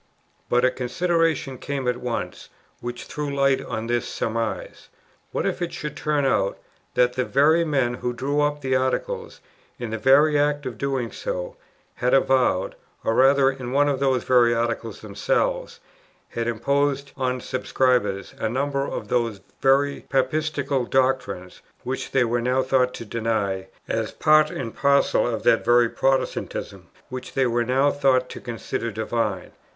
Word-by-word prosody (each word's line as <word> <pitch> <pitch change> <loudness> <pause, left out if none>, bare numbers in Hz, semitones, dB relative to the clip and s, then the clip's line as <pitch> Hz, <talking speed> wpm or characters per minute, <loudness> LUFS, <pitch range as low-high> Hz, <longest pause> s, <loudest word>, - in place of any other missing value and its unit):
But 125 +1 +3
a 130 - +3
consideration 165 0 0
came 140 -2 -3
up 125 - +2
at - - -11
once, 125 -2 -4 0.3
which 120 0 -6
threw 150 -2 -4
light 140 -1 +2
on 110 -2 -4
this 120 0 -1
surmise: 115 0 -3 0.4
what - - -2
if - - -2
it 175 - -2
should 150 -1 -5
turn 150 -2 0
out 100 -7 +1 0.4
that 125 0 +3
the 130 0 0
very 155 +6 +3
men 135 -6 +1
who 125 0 -3
drew 140 +4 -1
up 145 0 0
the 130 -1 0
Articles, 460 - -2 0.4
in 120 -3 -5
the 110 - -3
very 145 +4 +5
act 145 0 +1
of 120 -4 -6
doing 135 -4 -1
so, - - -4 0.4
had 125 +1 +2
avowed, 130 -8 +2 0.3
or 115 - +1
rather 135 +2 +5
in 130 -2 -7
one 145 +1 +4
of 140 -2 0
those 135 -2 +1
very 120 -2 +4
Articles 115 0 -2
themselves - - -1 0.5
had 115 0 -3
imposed 140 +4 0
on 130 -1 -1
subscribers, 125 -6 0
a 110 - 0
number 140 +3 -1
of - - -5
those 115 -4 0 0.2
very 140 +1 +2
"Papistical" 140 0 0
doctrines, 130 -9 0 0.2
which 130 +1 -4
they 135 - +3
were 120 0 0
now 130 +2 +1
thought 130 -1 +1
to 115 - -7
deny, 105 -4 -1 0.2
as - - -1
part 155 0 +4
and 115 -4 -5
parcel 140 -2 +3
of 115 -2 -3
that 115 - +4
very 120 0 +4
Protestantism, 135 +2 -2 0.2
which 130 0 -7
they 135 - +2
were 120 0 +1
now 135 +4 +2
thought 130 -3 +2
to - - -8
consider 115 -1 -4
divine? 110 -3 -2
130 Hz, 160 wpm, -24 LUFS, 120-140 Hz, 0.5 s, very